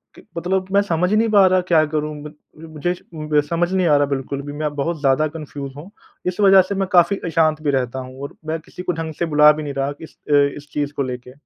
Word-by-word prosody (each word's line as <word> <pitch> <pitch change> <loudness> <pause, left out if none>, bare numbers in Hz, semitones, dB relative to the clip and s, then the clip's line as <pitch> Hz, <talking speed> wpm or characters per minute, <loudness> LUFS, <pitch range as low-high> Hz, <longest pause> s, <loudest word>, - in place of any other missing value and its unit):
की - - -14 0.2
मतलब 185 +2 -1
मैं 200 - +5
समझ 180 -1 0
नहीं 225 +1 +3
पा 205 -2 +6
रहा 185 0 +3
क्या 165 -3 +4
करूँ? 150 0 -1 0.6
मुझे 165 +4 -2 0.6
समझ 175 +1 0
नहीं 185 -2 +2
आ 150 - +5
रहा 145 - +3
बिल्कुल 140 0 -3
भी 145 +1 -7
मैं 150 0 -3
बहुत 155 +3 -2
ज़्यादा 140 +2 +2
कन्फ़्यूज़ 145 -3 -8
हूँ, 165 +6 -10 0.4
इस 180 +1 -3
वजह 195 -1 +7
से 200 - -1
मैं 195 -1 -1
काफ़ी 180 +2 +4
अशांत 160 -2 +1
भी 145 -2 0
रहता 130 -1 -1
हूँ 130 +1 -9
और 140 - -7
मैं 160 +1 -2
किसी 180 - -10
को 180 - 0
ढंग 160 0 -5
से 170 - +1
बुला 150 -1 +6
भी 155 0 -4
नहीं 145 -1 -5
रहा 140 +1 -1
इस 160 - -12
अ, - - +4 0.2
इस 145 0 -12
चीज़ 145 0 -2
को 140 - -1
लेके। 125 -1 -6
155 Hz, 240 wpm, -20 LUFS, 145-180 Hz, 0.6 s, वजह